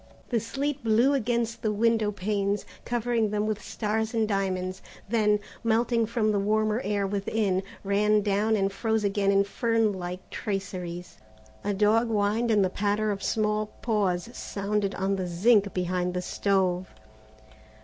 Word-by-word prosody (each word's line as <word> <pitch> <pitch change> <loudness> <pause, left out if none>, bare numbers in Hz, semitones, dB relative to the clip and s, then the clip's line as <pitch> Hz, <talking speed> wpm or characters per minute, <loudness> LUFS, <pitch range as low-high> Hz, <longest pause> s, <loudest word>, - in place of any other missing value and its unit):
The 235 - +1
sleet 275 +5 -3
blew 230 +5 +4
against 235 -3 -1
the 215 - 0
window 220 0 +2
panes, 200 0 -1 0.2
covering 235 -2 0
them 210 0 0
with 215 -1 -2
stars 220 +1 -2
and 220 -1 +2
diamonds, 185 -2 -1 0.3
then, 210 -1 +2 0.2
melting 230 0 +2
from 225 -2 +1
the 205 - +1
warmer 215 +3 +1
air 200 -1 0
within, 200 -1 0 0.2
ran 210 +1 +3
down 210 +2 +2
and 195 -1 +1
froze 220 +1 0
again 200 0 +2
in 200 0 +4
fern 225 +1 +1
like 180 0 -6
traceries. 180 - -5 0.4
A 205 0 -1
dog 215 +4 +3
whined 215 +2 +1
and 210 -3 +4
the - - 0
patter 210 +2 0
of 200 -1 -4
small 215 0 0 0.2
paws 200 -6 0
sounded 200 0 -2
on 195 +1 0
the 185 -1 -2
zinc 200 +3 +3
behind 180 0 -1
the 180 - -2
stove. 185 -2 0
210 Hz, 150 wpm, -27 LUFS, 195-225 Hz, 0.4 s, blew